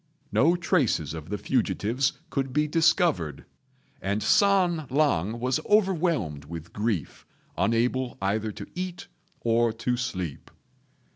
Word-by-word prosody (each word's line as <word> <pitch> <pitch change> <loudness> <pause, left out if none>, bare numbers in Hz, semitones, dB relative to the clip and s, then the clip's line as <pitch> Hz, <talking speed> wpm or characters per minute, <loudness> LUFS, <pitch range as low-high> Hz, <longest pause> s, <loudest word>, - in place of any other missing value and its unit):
No 170 +2 +4
traces 145 - +1
of 80 -1 -8
the 105 - -2
fugitives 120 +2 0 0.2
could 135 -2 -1
be 150 +1 +2
discovered, 155 - +2 0.6
and 100 +2 -1
San 180 -6 +3
lang 120 - +1
was 130 +4 0
overwhelmed 170 - +1
with 85 +2 -8
grief, 105 -6 -2 0.3
unable 120 +7 0
either 110 +3 -1
to - - -8
eat 180 -1 -5 0.3
or 115 0 +2
to 125 +2 -1
sleep. 90 - -4
120 Hz, 120 wpm, -26 LUFS, 95-155 Hz, 0.6 s, No